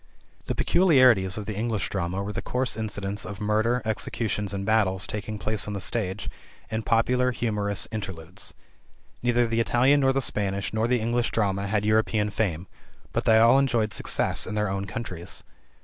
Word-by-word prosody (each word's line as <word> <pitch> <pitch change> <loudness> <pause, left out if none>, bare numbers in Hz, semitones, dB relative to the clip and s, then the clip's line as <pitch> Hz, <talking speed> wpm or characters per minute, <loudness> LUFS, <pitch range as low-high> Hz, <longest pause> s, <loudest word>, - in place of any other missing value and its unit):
The - - -1
peculiarities 130 - +4
of 105 - -5
the 105 - -4
English 110 -1 -1
drama 95 0 -2
were 105 +1 -5
the - - -3
coarse 125 0 -1
incidents 100 -2 -3
of 100 -3 -7
murders, 110 +4 +1
executions, 110 -1 -2
and 100 -1 -3
battles 100 -4 +2
taking 105 0 -5
place 110 0 -1
on 105 - -3
the 100 - -3
stage, 95 -1 -2 0.4
and 110 0 -2
popular, 125 +3 +2
humorous 105 -5 -1
interludes. 95 -5 -6 0.7
Neither 120 0 +2
the 115 0 -1
Italian 125 +5 +3
nor 135 -1 +3
the 135 - +1
Spanish 100 -6 -1
nor 110 +1 +1
the 125 0 +2
English 120 +1 0
drama 100 -2 0
had 105 0 0
European 110 -1 +2
fame, 95 -5 -1 0.5
but - - -1
they 110 - +6
all 115 +4 +6
enjoyed 120 -6 +1
success - - +1
in 110 - -4
their 105 -1 0
own 95 +1 -2
countries. 90 -3 -6
110 Hz, 175 wpm, -26 LUFS, 100-115 Hz, 0.7 s, they